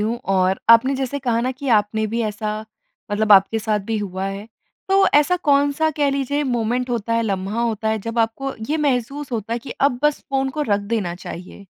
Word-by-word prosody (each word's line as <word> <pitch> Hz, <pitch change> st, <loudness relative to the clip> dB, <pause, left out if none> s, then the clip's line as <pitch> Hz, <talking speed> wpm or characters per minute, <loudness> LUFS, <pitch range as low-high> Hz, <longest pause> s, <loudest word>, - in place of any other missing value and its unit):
हूँ 225 Hz, +3 st, -1 dB, 0.2 s
और 185 Hz, +1 st, +2 dB
आपने 230 Hz, +4 st, +6 dB
जैसे 270 Hz, +1 st, -2 dB
कहा 240 Hz, -4 st, 0 dB
ना 255 Hz, +2 st, -1 dB
कि 275 Hz, +2 st, -6 dB
आपने 215 Hz, +1 st, 0 dB
भी 230 Hz, +2 st, -2 dB
ऐसा 215 Hz, 0 st, -3 dB, 0.5 s
मतलब 215 Hz, 0 st, +3 dB
आपके 200 Hz, +3 st, +5 dB
साथ 215 Hz, -1 st, 0 dB
भी 225 Hz, -1 st, -1 dB
हुआ 190 Hz, -2 st, -4 dB
है, 195 Hz, +2 st, -6 dB, 0.4 s
तो 390 Hz, 0 st, +4 dB
ऐसा 295 Hz, +5 st, +4 dB
कौन-सा 285 Hz, 0 st, +2 dB
कह 285 Hz, -2 st, +2 dB
लीजिए 280 Hz, +1 st, -1 dB
मोमेंट 245 Hz, 0 st, -1 dB
होता 230 Hz, -1 st, -2 dB
है, 230 Hz, -, +2 dB
लम्हा 200 Hz, +2 st, -2 dB
होता 220 Hz, -2 st, -1 dB
है 220 Hz, 0 st, 0 dB
जब 230 Hz, +3 st, -5 dB
आपको 230 Hz, +4 st, -1 dB, 0.2 s
ये 310 Hz, -, +2 dB
महसूस 275 Hz, -1 st, -1 dB
होता 225 Hz, -1 st, -3 dB
है, 235 Hz, -, 0 dB
कि 255 Hz, -, -11 dB
अब 270 Hz, -3 st, +2 dB
बस 295 Hz, -1 st, +2 dB
फ़ोन 270 Hz, -1 st, +1 dB
को 300 Hz, +2 st, -2 dB
रख 205 Hz, -5 st, +1 dB
देना 200 Hz, -4 st, -2 dB
चाहिए? 185 Hz, +2 st, -10 dB
230 Hz, 210 wpm, -21 LUFS, 210-275 Hz, 0.5 s, आपने